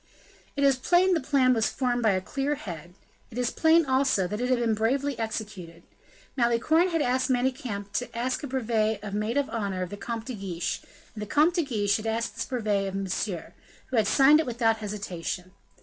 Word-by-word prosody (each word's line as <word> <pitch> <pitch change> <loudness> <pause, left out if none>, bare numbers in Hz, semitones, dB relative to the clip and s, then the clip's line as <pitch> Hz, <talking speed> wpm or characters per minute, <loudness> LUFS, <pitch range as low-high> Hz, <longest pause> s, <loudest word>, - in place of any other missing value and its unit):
It 280 - 0
is 275 -2 +4
plain 355 +8 +3
the 335 - +2
plan 260 -2 +3
was 225 -2 +1
formed 245 -2 -1
by 220 -3 +3
a 185 - 0
clear 275 +9 -2
head; 175 - -8 0.3
it 240 - -10
is 245 -1 0
plain, 320 0 +4
also, 260 -7 +2
that 210 +4 -4
it 250 - 0
had 255 - +3
been 235 -2 +1
bravely 265 +6 0
executed. 205 -7 -5 0.5
Malicorne 260 +8 +3
had 330 -3 +1
asked 255 +2 +1
Manicamp 245 -5 -1
to 245 -1 -3
ask 255 +2 -1
a 285 - -5
brevet 220 -5 0
of 205 -2 -6
maid 215 +5 -1
of 285 -1 +1
honor 200 -5 -2
of 180 - -7
the 205 - -6
Comte 225 +2 -5
de 255 - -5
Guiche; 190 -5 -3 0.3
and 215 - -8
the 210 - -4
Comte 305 - +3
de 345 -1 +1
Guiche 205 -7 +1
had 220 0 -5
asked 225 +1 -1
this - - -3
brevet 210 -6 -1
of 195 - -5
Monsieur, 195 -1 -3 0.4
who - - -1
had 220 -3 +3
signed 270 +7 +6
it 315 - -1
without 230 -2 +1
hesitation. 190 -4 -5
230 Hz, 210 wpm, -27 LUFS, 205-265 Hz, 0.5 s, signed